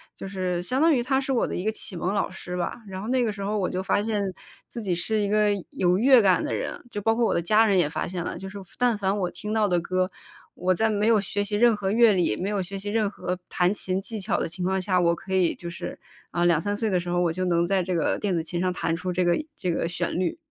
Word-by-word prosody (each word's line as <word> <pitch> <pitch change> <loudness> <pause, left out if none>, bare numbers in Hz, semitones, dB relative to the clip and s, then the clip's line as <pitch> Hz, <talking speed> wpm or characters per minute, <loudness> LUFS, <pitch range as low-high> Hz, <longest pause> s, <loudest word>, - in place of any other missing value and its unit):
就 - - -7
是 185 -2 -2
相 255 +10 -1
当 325 -1 +5
于 245 - +2
他 265 +1 +1
是 270 - -3
我 240 - +1
的 - - -4
一 180 - -3
个 220 - +1
启 205 -3 -3
蒙 180 +3 -1
老 205 - 0
师 180 - -7
吧， 180 +6 -3
然 190 0 -6
后 215 - -6
那 255 0 +2
个 220 - 0
时 200 - -8
候 210 +2 -1
我 185 - 0
就 185 - -2
发 195 +1 +1
现 215 -2 -1 0.5
自 235 - -6
己 190 -4 -1
是 215 +6 0
一 200 - 0
个 210 0 +3 0.2
有 180 0 +1
乐 255 +2 +6
感 190 -3 +3
的 - - -2
人， - - -4
就 205 - -4
包 225 +2 +2
括 235 - +2
我 - - +1
的 - - +1
家 215 +6 +4
人 200 -3 +3
也 160 - +3
发 - - -2
现 175 -1 -4
了， - - -4
就 190 - -7
是 200 - -9 0.2
但 245 -3 +2
凡 195 0 0
我 180 -2 -1
听 210 +1 -5
到 215 -1 +3
的 175 -2 +2
歌， 185 +2 -1 0.4
我 185 +1 +1
在 220 +5 +2
没 210 0 +1
有 225 -2 +5
学 205 0 -2
习 205 +1 -2
任 235 0 +5
何 200 -2 -2
乐 230 +1 +6
理， 175 - +1
没 190 - -3
有 205 -2 0
学 195 +2 -5
习 200 +1 -5
任 215 -1 +1
何 180 -3 -4
弹 180 +2 +2
琴 190 -1 -1
技 220 +1 -5
巧 195 +1 0
的 - - -1
情 180 +2 -5
况 190 0 +1
下， 185 0 +1
我 170 -1 +3
可 190 - -7
以 185 -3 +3
就 170 - -7
是 170 - -6 0.3
呃， 175 0 +1
2-3 175 +4 +2
岁 220 +1 -1
的 185 -2 +2
时 175 0 -5
候， 175 0 +1
我 170 -2 +2
就 185 +2 -2
能 170 -1 +2
在 195 0 +1
这 180 0 -2
个 165 - 0
电 200 -3 0
子 165 - -1
琴 175 +1 -4
上 185 0 +1
弹 165 - -1
出 180 +2 -3
这 180 +1 +1
个 175 - +3 0.2
这 180 - -2
个 165 - -1
旋 175 0 -2
律。 185 - -1
190 Hz, 315 characters per minute, -25 LUFS, 180-215 Hz, 0.5 s, 乐